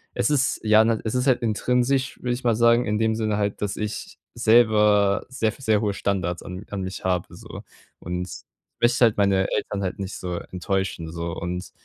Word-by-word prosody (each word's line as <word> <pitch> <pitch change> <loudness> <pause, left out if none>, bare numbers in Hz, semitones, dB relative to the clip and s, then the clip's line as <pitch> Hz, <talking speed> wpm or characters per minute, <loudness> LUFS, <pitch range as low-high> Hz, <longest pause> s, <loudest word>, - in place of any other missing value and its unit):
es 115 - +1
ist 140 -2 +1
ja, 110 0 +6
ne, 115 -1 +1
es 110 - -1
ist 125 +2 0
halt 125 -2 +3
intrinsisch, 125 +4 0
würde 125 -1 -1
ich 125 - -6
mal 115 -2 +2
sagen, 120 +1 +4
in 105 0 0
dem 110 0 +1
Sinne 110 -2 -1
halt, 100 0 -2
dass 100 -1 -2
ich 105 0 -5 0.2
selber 105 -3 +4
sehr 115 -4 0
f 115 - -8
sehr 110 -5 +2
hohe 105 -2 -1
Standards 90 -4 -2
an 90 +3 -8
an 100 -2 -3
mich 95 +1 -6
habe 90 -2 0
so. - - -10 0.4
Und 90 +1 -4
ich 90 - -9 0.4
möchte 120 +1 +4
halt 110 - +2
meine 100 -2 +2
Eltern 100 -1 -2
halt 95 +1 -3
nicht 95 0 -5
so 90 -1 -5
enttäuschen, 90 -3 -3
so 85 0 -4
und 90 +2 -5
105 Hz, 210 wpm, -24 LUFS, 95-115 Hz, 0.4 s, ja